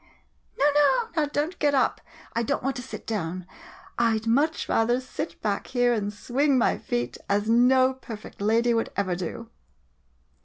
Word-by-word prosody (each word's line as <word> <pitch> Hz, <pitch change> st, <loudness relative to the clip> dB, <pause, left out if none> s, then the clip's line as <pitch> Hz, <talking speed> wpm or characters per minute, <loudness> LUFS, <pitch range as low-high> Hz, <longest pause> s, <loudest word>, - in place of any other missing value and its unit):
] -, -, -40 dB
No, 280 Hz, -, +2 dB
no, 445 Hz, +12 st, +3 dB
now 310 Hz, -2 st, +2 dB
don't 295 Hz, +4 st, -2 dB
get 290 Hz, -1 st, +2 dB
up, 265 Hz, -, +1 dB, 0.3 s
I 230 Hz, -, 0 dB
don't 235 Hz, -, -1 dB
want 270 Hz, +1 st, -1 dB
to -, -, -4 dB
sit 260 Hz, -, -9 dB
down 185 Hz, -4 st, -3 dB, 0.3 s
— -, -, -14 dB
I 230 Hz, -2 st, +3 dB
'd 220 Hz, -, -7 dB
much 285 Hz, +8 st, +1 dB
rather 240 Hz, +2 st, +2 dB
sit 260 Hz, +5 st, -6 dB
back 205 Hz, -2 st, -1 dB
here 245 Hz, -1 st, +2 dB
and 205 Hz, -3 st, -1 dB
swing 265 Hz, +6 st, +1 dB
my 245 Hz, -, +2 dB
feet, 120 Hz, 0 st, -3 dB
as 205 Hz, +1 st, +1 dB
no 255 Hz, +3 st, +4 dB
perfect 225 Hz, -6 st, -10 dB
lady 230 Hz, +3 st, +3 dB
would 225 Hz, 0 st, 0 dB
ever 185 Hz, -3 st, 0 dB
do! 225 Hz, +6 st, -6 dB
235 Hz, 185 wpm, -26 LUFS, 215-265 Hz, 0.3 s, no